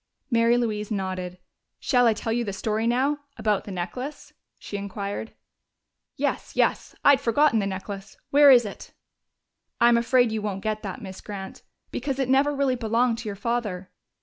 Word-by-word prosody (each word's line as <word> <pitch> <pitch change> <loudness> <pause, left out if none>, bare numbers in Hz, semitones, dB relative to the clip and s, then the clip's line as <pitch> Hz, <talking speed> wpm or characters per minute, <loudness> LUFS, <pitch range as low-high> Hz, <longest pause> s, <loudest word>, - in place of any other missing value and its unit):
Mary 230 0 +4
Louise 215 -3 -1
nodded. 185 -3 -3 0.4
"Shall 245 -2 +3
I 225 - +3
tell 225 - -2
you 240 +1 0
the 200 -3 -4
story 220 +3 -1
now 270 +5 +1 0.2
about 215 -3 0
the 205 - -7
necklace?" 190 +11 -6 0.2
she - - -8
inquired. 200 +2 -5 0.8
"Yes, - - -2
yes. - - +1
I - - +9
had 275 -1 +3
forgotten 280 0 +3
the 200 - 0
necklace. 195 +1 -6
Where 285 0 +7
is 245 -3 +7
it?" 205 - -9 0.9
"I'm 235 0 +6
afraid 245 0 +3
you 220 -1 -2
won't 195 -2 -4
get 215 0 -1
that, 195 -1 -6
Miss 190 -1 -8
Grant, 195 -2 -8 0.3
because 270 +1 -3
it 265 -2 -1
never 275 +2 +4
really 275 -2 +1
belonged 230 0 +1
to 230 -3 -5
your 200 - -5
father." 200 -4 -3
225 Hz, 175 wpm, -25 LUFS, 200-245 Hz, 0.9 s, I